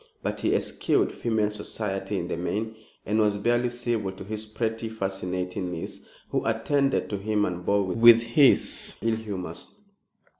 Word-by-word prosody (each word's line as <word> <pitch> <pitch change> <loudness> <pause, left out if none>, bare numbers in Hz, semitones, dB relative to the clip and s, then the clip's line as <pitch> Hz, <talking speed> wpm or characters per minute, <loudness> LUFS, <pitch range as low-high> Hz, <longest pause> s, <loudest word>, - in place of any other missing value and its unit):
But - - -2
he - - +2
eschewed - - +1
female 110 -3 0
society 105 -1 -4
in - - -2
the - - -2
main, 105 +6 -3 0.3
and 105 +2 +1
was 105 -1 +3
barely 120 +3 +2
civil 120 -5 -2
to 95 - -9
his 110 +2 -5
pretty, 115 +1 -2
fascinating 95 -3 -3
niece, 85 -2 -6 0.3
who - - 0
attended 135 +5 +1
to 100 - -2
him 105 0 +1
and 90 0 -4
bore 100 +2 +2
with 115 +4 +7
his 130 +4 +3
ill 115 0 +2
humors. 95 -6 -6
105 Hz, 155 wpm, -26 LUFS, 95-115 Hz, 0.3 s, with